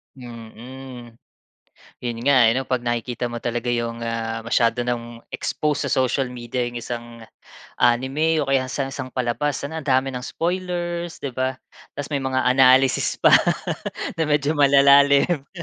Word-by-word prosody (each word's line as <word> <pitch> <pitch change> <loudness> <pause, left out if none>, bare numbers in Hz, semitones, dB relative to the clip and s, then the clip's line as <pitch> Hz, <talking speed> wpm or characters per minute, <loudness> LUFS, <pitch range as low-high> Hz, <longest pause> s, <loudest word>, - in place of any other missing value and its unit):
Mm. 120 0 -11 0.9
Yun 120 -1 -3
nga, 140 - +5
eh, - - +5
ano, 130 - 0
'pag 130 -2 0
nakikita 120 +1 -2
mo 120 - -4
talaga 120 0 -3
yung, 115 -1 -2
ah, 115 0 -3
masyado 115 +1 +1
nang 120 -1 -4
expose 150 -1 -2
sa - - -5
social 130 +1 -1
media 125 0 -4
yung 120 - -9
isang 120 0 -6 0.7
anime 135 +7 +2
o 135 - -8
kaya 135 -1 +2
sa 135 -1 -2
isang 130 - -5
palabas 130 +3 -1
ang 145 +3 -5
dami 135 0 +2
ng 125 -1 -6
spoilers, 175 -1 -3
di 140 - -3
ba? 130 +1 -2 0.4
Tapos 145 +1 -5
may 140 - 0
mga 130 0 0
analysis 130 0 +4
pa - - +5 0.9
na 160 - +3
medyo 145 -1 +1
malalalim. 140 +1 +5
130 Hz, 150 wpm, -22 LUFS, 120-140 Hz, 0.9 s, nga